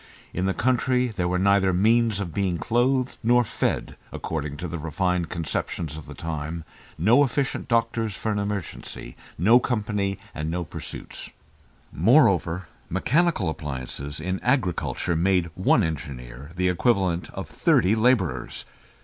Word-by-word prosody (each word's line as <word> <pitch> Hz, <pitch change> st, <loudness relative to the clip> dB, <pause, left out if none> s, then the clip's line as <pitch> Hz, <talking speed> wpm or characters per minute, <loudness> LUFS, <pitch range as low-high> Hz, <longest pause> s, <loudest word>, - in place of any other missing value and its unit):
In 90 Hz, +2 st, 0 dB
the 95 Hz, -, +1 dB
country 125 Hz, +1 st, +1 dB
were 90 Hz, 0 st, 0 dB
neither 95 Hz, 0 st, +4 dB
means 110 Hz, +2 st, +3 dB
of 90 Hz, -5 st, -4 dB
being 95 Hz, -3 st, 0 dB
clothed 125 Hz, +5 st, +1 dB
nor 120 Hz, +1 st, +4 dB
fed -, -, -2 dB, 0.2 s
(according 75 Hz, -3 st, -4 dB
to 90 Hz, +3 st, -4 dB
the 85 Hz, 0 st, -5 dB
refined 85 Hz, +2 st, -1 dB
conceptions 80 Hz, -2 st, -3 dB
of 80 Hz, -2 st, -9 dB
the -, -, -9 dB
time), 80 Hz, 0 st, -4 dB, 0.3 s
no 115 Hz, -, +5 dB
efficient 135 Hz, +1 st, -1 dB
doctors 115 Hz, -3 st, +1 dB
for 110 Hz, -, -2 dB
an 105 Hz, -, 0 dB
emergency, 100 Hz, -10 st, -5 dB, 0.2 s
no 110 Hz, +9 st, +6 dB
company 105 Hz, -5 st, -1 dB, 0.2 s
and 75 Hz, +1 st, -3 dB
no 90 Hz, +2 st, -2 dB
pursuits. 80 Hz, -, -8 dB, 0.6 s
Moreover, 95 Hz, -, +3 dB, 0.2 s
mechanical 165 Hz, -, +2 dB
appliances 70 Hz, -2 st, -4 dB
in 90 Hz, +4 st, -2 dB
agriculture 100 Hz, -, 0 dB
made 90 Hz, 0 st, +2 dB
one 95 Hz, +5 st, +3 dB
engineer 70 Hz, -4 st, -5 dB
the 90 Hz, +1 st, +1 dB
equivalent 90 Hz, -2 st, +1 dB
of -, -, -6 dB
thirty 95 Hz, +4 st, +3 dB
labourers. 110 Hz, -, +1 dB
95 Hz, 135 wpm, -25 LUFS, 80-115 Hz, 0.6 s, no